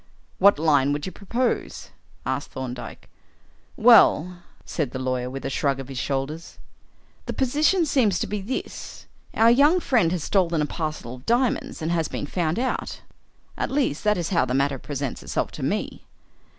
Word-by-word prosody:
"What 200 -1 +6
line 145 -3 +3
would 145 0 -3
you 185 - -5
propose?" 235 +6 -2 0.3
asked 130 +2 -2
Thorndyke. 125 -2 -7 0.7
"Well," 175 +3 +5 0.2
said 150 -7 -3
the - - -3
lawyer, 130 -1 -2
with 135 +1 -7
a - - -1
shrug 135 0 0
of 135 0 -8
his 135 -2 -5
shoulders, 140 +5 -4 0.7
"the - - -2
position 300 +7 +2
seems 235 - +2
to - - -1
be 210 -1 -4
this: 230 +7 -6 0.3
our 225 +1 +6
young 290 +8 +5
friend 225 - +2
has 175 -4 -2
stolen 175 -5 +1
a 150 - +2
parcel 155 -6 -4
of 125 0 -13
diamonds 240 -7 0
and 160 - -1
has 165 -3 0
been - - -4
found 165 +1 -1
out; 255 +2 -2 0.5
at - - -2
least, 265 - 0
that 210 0 +2
is 170 -2 -2
how 175 - +2
the 125 0 -1
matter 135 -1 +1
presents 140 -2 -4
itself - - -2
to - - -9
me." - - -2
165 Hz, 175 wpm, -24 LUFS, 135-210 Hz, 0.7 s, What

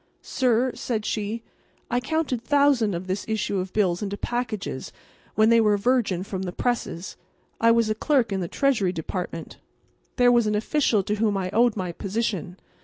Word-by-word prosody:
"Sir," 250 0 +1
said 220 -4 -3
she, 215 +2 -2 0.5
"I 245 - +2
counted 275 -2 -1
thousands 265 -6 +3
of 175 +2 -5
this 190 +2 -2
issue 210 -3 -1
of 185 0 -4
bills 185 -5 +1
into 200 -1 -3
packages 235 -3 -3 0.4
when 215 +1 +5
they 230 0 +6
were 210 -2 +3
virgin 205 -5 +1
from 190 -1 -5
the 185 -2 -3
presses. 195 -5 -3 0.4
I 230 - +4
was 230 -1 +4
a 215 - +1
clerk 245 -1 +1
in 195 - -1
the 175 - -2
Treasury 215 -6 +1
Department. 170 0 -5 0.6
There 245 -1 +5
was 235 -2 +3
an 210 - +1
official 225 -2 +1
to 210 +3 -2
whom 210 -2 +1
I 185 -1 -2
owed 235 +1 +3
my 185 -2 -2
position. 195 -2 -3
215 Hz, 180 wpm, -25 LUFS, 190-240 Hz, 0.6 s, they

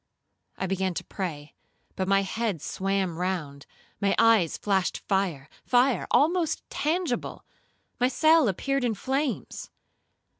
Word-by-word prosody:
I - - -2
began 190 -1 -1
to - - -3
pray, 155 -7 -6 0.4
but 190 - -2
my 195 0 +3
head 210 -2 -2
swam 190 0 -2
round, 160 -7 -3 0.3
my 200 -1 +2
eyes 225 -8 +4
flashed 195 -3 0
fire,—fire 195 - 0
almost 330 +2 +2
tangible, 310 -4 -2 0.5
my 250 - +4
cell 310 +2 +4
appeared 275 +7 -1
in 235 -3 0
flames. 270 +5 -3
195 Hz, 115 wpm, -27 LUFS, 185-260 Hz, 0.5 s, eyes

